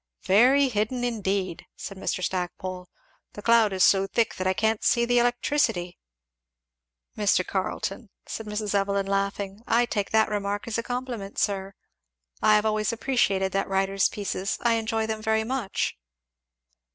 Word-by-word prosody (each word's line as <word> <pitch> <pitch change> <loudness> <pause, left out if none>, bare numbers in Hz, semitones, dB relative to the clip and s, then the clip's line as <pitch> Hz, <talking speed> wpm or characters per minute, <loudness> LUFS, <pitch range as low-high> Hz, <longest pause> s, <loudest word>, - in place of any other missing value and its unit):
"Very 255 +8 +5
hidden 230 +2 -1
indeed!" 195 -6 -2
said 195 - -7
Mr. 185 -1 -3
Stackpole; 180 0 -4 0.4
"the 205 - -9
cloud 230 -2 +5
is 190 -1 +2
so 195 0 +4
thick 230 +2 +1
that 185 - -1
I 185 - +3
can't 220 +2 0
see 235 0 +3
the 245 0 +3
electricity!" 240 -7 0 1.2
"Mr. 200 -3 +2
Carleton," 195 +3 -3 0.2
said 225 - -6
Mrs. 210 -1 -3
Evelyn 200 0 +1
laughing, 195 0 -2
"I 240 +1 +3
take 205 -4 -2
that 220 0 +3
remark 205 0 -2
as 230 0 -1
a - - 0
compliment, 245 -4 -5
sir. 195 -1 -1 0.7
I 215 0 +5
have 210 +1 +2
always 215 0 +1
appreciated 220 -6 +1
that 195 0 -1
writer's 195 0 +2
pieces 200 -1 -3
I 235 -1 +4
enjoy 225 0 0
them 220 0 -3
very 220 0 +1
much." 235 -4 -2
210 Hz, 150 wpm, -26 LUFS, 195-230 Hz, 1.2 s, Very